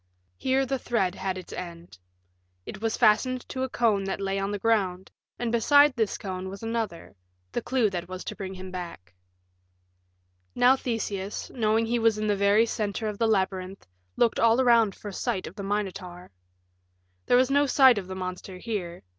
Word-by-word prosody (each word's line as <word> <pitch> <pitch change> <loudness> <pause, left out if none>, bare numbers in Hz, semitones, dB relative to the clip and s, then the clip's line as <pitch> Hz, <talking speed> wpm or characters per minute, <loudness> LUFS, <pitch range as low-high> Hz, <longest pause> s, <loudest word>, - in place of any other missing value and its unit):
Here 265 - +1
the 265 0 -2
thread 195 -8 0
had 190 -1 -3
its 185 - -9
end. 170 - -8 0.7
It 195 - -8
was 225 -1 -1
fastened 245 +3 +2
to 260 - -4
a 260 - -1
cone 220 -5 +1
that 195 - -3
lay 195 0 -1
on 195 0 -2
the 205 - -2
ground, 195 -4 0 0.3
and 240 -1 -2
beside 285 +4 +5
this 220 -4 0
cone 190 -1 -5
was 195 +3 -9
another 225 - -4 0.4
the - - -2
clue 250 -4 +1
that 175 -2 -4
was 185 0 -6
to - - -6
bring 190 -1 -6
him 185 0 -8
back. 170 - -8 1.4
Now 250 +2 +5
Theseus, 210 -6 -4
knowing 220 -1 +1
he 235 +1 0
was 225 -1 +3
in 215 - -2
the 205 -1 +2
very 200 +3 +4
center 215 0 -3
of 210 -1 -5
the 230 - +3
labyrinth, 190 -2 -1 0.3
looked 235 -2 +2
all 230 +1 +4
around 235 -5 +4
for 205 - -8
sight 195 0 -2
of - - -8
the 200 - -6
Minotaur. 195 -3 -4 1.0
There 245 - +5
was 255 +1 +3
no 285 +1 +3
sight 260 -4 +6
of 185 - -8
the 185 - -6
monster 185 0 -6
here. 180 -5 -5
205 Hz, 185 wpm, -26 LUFS, 190-235 Hz, 1.4 s, sight